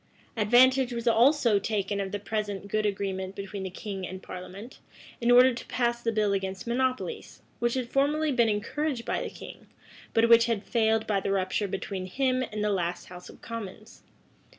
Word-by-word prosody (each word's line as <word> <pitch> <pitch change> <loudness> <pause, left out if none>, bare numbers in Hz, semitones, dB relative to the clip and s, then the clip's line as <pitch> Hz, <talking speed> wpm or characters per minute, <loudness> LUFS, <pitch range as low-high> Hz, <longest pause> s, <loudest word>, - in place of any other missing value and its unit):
Advantage 250 +4 +4
was 235 0 -4
also 235 -2 +4
taken 200 -1 -2
of 195 -1 -4
the 205 - -2
present 205 -1 -4
good 215 +1 0
agreement 195 -1 -3
between 200 0 -6
the 190 - -4
king 195 +1 -6
and 190 0 -8
parliament, 185 +6 -9 0.4
in 235 - +1
order 250 +1 +7
to 235 - -7
pass 240 -1 0
the 230 - 0
bill 210 -2 +1
against 190 -1 -3
monopolies, 260 - -2 0.2
which 240 +1 0
had 255 -2 -2
formerly 295 +4 +1
been 240 -3 +3
encouraged 235 +5 -2
by - - -1
the - - -4
king, - - -11 0.5
but 225 0 +5
which 230 0 +6
had 225 -3 -1
failed 220 -1 +1
by 205 -2 +1
the 195 - -2
rupture 195 +1 0
between 190 -1 -4
him 255 +5 0
and 210 0 -3
the 210 - +1
last 175 -2 -2
house 180 0 -11
of - - -15
commons. 220 0 -8
215 Hz, 185 wpm, -27 LUFS, 195-240 Hz, 0.5 s, order